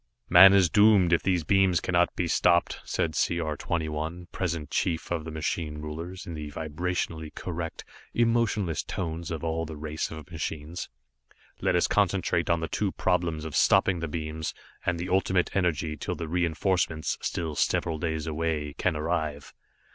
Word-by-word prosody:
"Man 95 +2 +10
is 95 -2 +5
doomed, 100 -1 +5
if 85 - +4
these 90 -3 +1
beams 95 +1 +3
cannot 90 -1 +1
be 90 - 0
stopped," 85 +1 +2
said 80 - -1
C 85 +3 +1
R 80 -2 -2
21, 80 +2 -3
present 85 -5 -3
chief 85 -1 -1
of 80 -3 -1
the - - -5
machine 80 0 -3
rulers, 80 +5 -6
in 85 - -6
the 75 -2 -5
vibrationally 80 +1 -3
correct, 85 -2 -5 0.3
emotionless 115 -7 +1
tones 85 -2 -4
of 80 -2 -4
all 80 0 -1
the 80 -1 -7
race 80 +1 -3
of 80 +2 -9
machines. 80 0 -5 0.7
"Let - - +2
us 90 - +3
concentrate 95 -3 +1
on 85 -1 +2
the 80 - -2
two 100 +2 -1
problems 85 -3 0
of 80 - -5
stopping 90 -2 +4
the 85 - -3
beams, 80 0 -4 0.3
and 90 -1 0
the 90 +2 -4
Ultimate 95 -1 +1
Energy 80 -4 0
till - - -3
the 85 - -5
reenforcements, 85 -1 0
still 80 -3 -2
several 80 +2 0
days 80 -2 -2
away, 80 -2 -2
can - - +1
arrive." 75 -2 -2
85 Hz, 165 wpm, -27 LUFS, 80-90 Hz, 0.7 s, Man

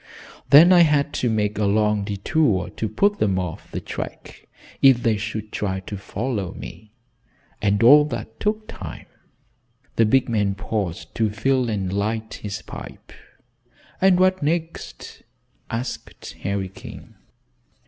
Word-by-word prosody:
Then 165 +6 +8
I 180 - +7
had 150 -3 +3
to 125 - +1
make 105 -1 0
a 105 - +2
long 105 0 +2
detour 100 - 0
to 110 - -3
put 205 - +1
them 95 -3 +1
off 90 -3 -5
the - - -4
track - - -8 0.3
if 130 -3 +6
they 115 -2 +3
should 110 0 -5
try 95 -2 -2
to 100 - -7
follow 100 0 -4
me, 105 +6 -11 0.7
and 105 +1 +2
all 145 +5 +8
that 115 -6 -6
took 215 +1 -1
time." - - -8 0.9
The 115 - +5
big 130 +3 +3
man 105 -4 0
paused 100 -6 -4
to 110 -2 +1
fill 125 +4 0
and 95 -4 -2
light 110 +2 -2
his 105 0 -5
pipe. - - -10 0.9
"And 190 -1 +5
what 185 0 +3
next?" 165 +2 -4 0.5
asked 115 +2 -6
Harry 100 -1 -2
King. 95 - -12
110 Hz, 140 wpm, -22 LUFS, 100-135 Hz, 0.9 s, Then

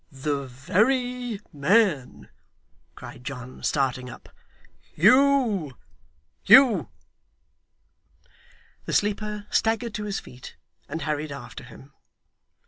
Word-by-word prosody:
'The 140 0 -3
very 240 - 0
man!' 145 - +1 0.7
cried 125 - -11
John, 125 0 -8
starting 130 -3 -1
up. 120 - -13 0.7
'Hugh! 225 - +3 0.6
Hugh!' 225 - +6 2.0
The - - -4
sleeper 210 0 -1
staggered 225 0 0
to 210 0 -4
his 205 -2 -3
feet, 125 0 -13 0.3
and 165 - -4
hurried 150 -1 -3
after 140 - -9
him. 130 +3 -15
165 Hz, 90 wpm, -25 LUFS, 135-225 Hz, 2.0 s, Hugh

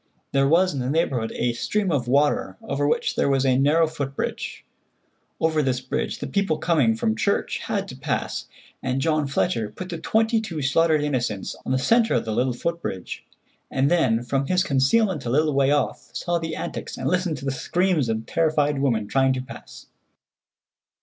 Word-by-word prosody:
There 135 0 +3
was 180 +5 +3
in 140 - -3
the 125 0 -2
neighborhood 135 -7 0
a 120 0 0
stream 195 - -1
of 130 -6 0
water 150 - +1
over 145 -8 -1
which - - 0
there - - +2
was 135 -1 +2
a 130 -1 +3
narrow 150 +5 +4
foot 140 -4 -5
bridge. - - -4 0.7
Over 160 -1 +2
this 130 -3 0
bridge 130 0 -3
the - - -5
people 195 -6 0
coming 140 -10 +2
from 110 -1 0
church - - 0
had - - -2
to - - -8
pass, - - -3 0.3
and 130 0 -1
John 155 0 +1
Fletcher 135 -5 0
put 180 - -8
the 170 -2 -5
twenty 225 +3 +2
two 170 -8 -5
slaughtered 155 +2 +3
innocents 125 -9 -2
on - - -1
the 130 - +3
centre 230 - +3
of - - 0
the 110 - -3
little 125 +3 +1
foot 170 +7 -3
bridge, 95 - -6 0.4
and 135 +3 +1
then 125 -9 +2
from 135 +2 -1
his 185 0 +2
concealment 150 - +2
a - - -1
little 150 +4 +2
way 135 0 +3
off 145 0 0
saw 175 -1 -1
the 160 -1 -4
antics 170 +1 -5
and - - -3
listened 180 -3 0
to 135 - -8
the 135 - 0
screams 175 -1 0
of 110 0 -2
the - - -16
terrified 150 -3 +2
women 120 -6 +1
trying 135 +3 +2
to 130 - -2
pass. 130 - -11
145 Hz, 195 wpm, -24 LUFS, 130-165 Hz, 0.7 s, narrow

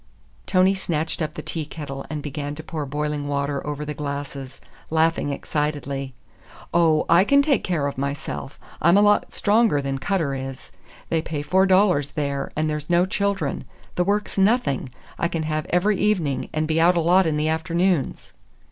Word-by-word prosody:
Tony 185 0 +4
snatched 165 -4 -1
up 155 - -2
the - - -6
tea 160 - -3
kettle 145 -3 -7
and 150 -2 -4
began 145 0 -4
to 160 - -8
pour 155 -3 -5
boiling 150 0 -2
water 140 0 -1
over 150 0 -3
the 150 - -4
glasses, 140 -2 -6 0.3
laughing 160 -1 +2
excitedly. 140 -2 -3 0.6
"Oh, 165 -2 +3
I 170 +3 +6
can 280 +7 +4
take 280 -2 +2
care 165 -6 0
of 140 -2 -3
myself! 135 - -4 0.2
I'm 170 +5 +5
a - - +6
lot 205 0 +3
stronger 210 -6 +3
than 135 -1 -2
Cutter 160 -3 0
is. 135 0 -6 0.4
They 165 - +1
pay 150 -2 -4
four 190 +6 +3
dollars 185 -7 +3
there, 140 -2 -2
and 155 +1 0
there's 150 0 -3
no 175 +1 +4
children. 200 +1 -1 0.3
The 180 - +1
work's 205 +1 -1
nothing; 195 - +2 0.3
I 170 - +2
can 165 -2 -3
have 155 0 -2
every 190 +3 +2
evening, 170 -11 0
and 155 0 -1
be 160 +1 +1
out 175 +1 +5
a - - +4
lot 175 +2 +4
in 155 -1 0
the 155 +1 +1
afternoons." 170 -1 0
155 Hz, 180 wpm, -23 LUFS, 145-180 Hz, 0.6 s, I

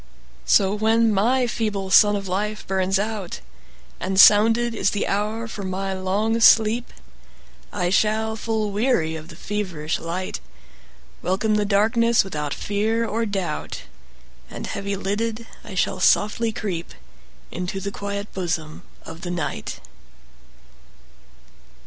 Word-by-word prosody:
So 195 -1 +4
when 220 +1 +2
my 245 +6 +2
feeble 210 -5 -2
sun 205 +1 +6
of 200 -1 -4
life 210 +3 -2
burns 190 0 +1
out, 205 -3 -3 0.6
And 190 +1 -1
sounded 225 +4 +6
is 215 - +1
the 205 - -1
hour 215 +3 -2
for 220 - -7
my 190 0 -3
long 200 +5 0
sleep,I 175 - 0
shall, 220 +2 +1
full 220 -1 -2
weary 200 -7 +1
of 160 0 -8
the 165 - -12
feverish 180 -6 -3
light, 175 +3 -4 0.8
Welcome 205 +4 0
the 210 -1 +2
darkness 225 +3 +3
without 150 -6 -4
fear 220 +6 -1
or 225 +1 -1
doubt, 195 -3 -4 0.7
And - - -7
heavy 200 0 -3
lidded, 220 +4 -3 0.2
I 195 - -9
shall 185 - 0
softly 210 +5 +2
creepInto 185 0 -7
the 200 - -3
quiet 200 +1 -5
bosom 165 -4 -3 0.2
of 165 +1 -10
the 175 - -5
Night. 170 - -4
200 Hz, 125 wpm, -23 LUFS, 185-220 Hz, 0.8 s, sun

